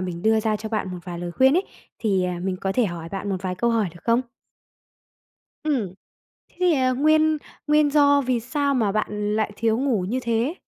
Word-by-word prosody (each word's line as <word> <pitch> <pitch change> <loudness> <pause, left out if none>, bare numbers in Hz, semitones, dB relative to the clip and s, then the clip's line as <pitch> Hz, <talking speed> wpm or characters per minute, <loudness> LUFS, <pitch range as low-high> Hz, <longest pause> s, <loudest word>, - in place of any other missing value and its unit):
mình 175 -2 -5
đưa 220 0 +3
ra 215 -1 0
cho 215 +1 -6
bạn 215 -4 -2
một 180 - -6
vài 175 -2 -6
lời 175 0 -4
khuyên 265 - +4
ấy, 375 - +1 0.3
thì, 195 -5 +1
à, 180 -1 -2
mình 185 0 -2
có 195 +1 -2
thể 245 +3 +2
hỏi 170 -3 -6
bạn 195 +2 -5
một 195 - 0
vài 185 -1 -2
câu 235 +6 0
hỏi 225 -4 +1
được 175 - -14
không? 230 +1 +3 1.4
Ừm. 245 - -1 0.5
Thế - - -30
thì, 360 -2 +4
à, 260 -2 +2
nguyên 310 +3 +3 0.3
nguyên 300 0 +4
do 285 -1 +5
vì 255 -3 0
sao 280 +4 -1
mà 220 -6 +1
bạn 210 0 -1
lại 215 -1 0
thiếu 225 0 +1
ngủ 260 -6 +1
như 255 +3 -1
thế? 235 +7 0
225 Hz, 220 wpm, -23 LUFS, 195-275 Hz, 1.4 s, do